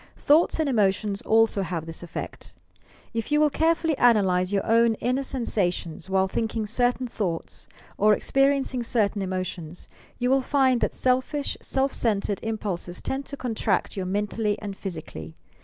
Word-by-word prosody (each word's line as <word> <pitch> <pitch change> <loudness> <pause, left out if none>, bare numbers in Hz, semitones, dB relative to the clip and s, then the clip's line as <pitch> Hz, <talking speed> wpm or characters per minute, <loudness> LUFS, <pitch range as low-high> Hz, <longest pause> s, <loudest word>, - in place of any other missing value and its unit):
Thoughts 315 +3 +3
and 315 - +1
emotions 205 -4 +1
also 225 -2 +3
have 170 -3 -3
this 165 -1 -5
effeet. 175 -2 -7 0.6
If 230 +4 -3
you 295 - +4
will 300 -1 +4
carefully 325 +1 +2
analyse 190 -6 +3
your 200 -1 0
own 230 0 +4
inner 250 +4 -1
sensations 190 - -2
while 190 0 +2
tliinking 220 +2 -2
certain 245 +2 +1
thoughts 195 -8 -4 0.3
or 210 +1 +5
experiencing 275 -1 +1
certain 220 -3 +1
emotions, 185 -3 -4 0.3
you 250 +1 0
will 270 0 +4
find 260 -2 +2
that - - 0
seltish, 260 +3 0
self 270 0 0
centred 205 -3 0
im 225 0 -2
pulses 180 -4 -4
tend 270 +1 -4
to 280 - -6
contract 225 -6 -1
you 195 - -2
mentally 205 +2 -1
and 200 -2 -6
physically. 155 - -7
220 Hz, 155 wpm, -25 LUFS, 190-255 Hz, 0.6 s, or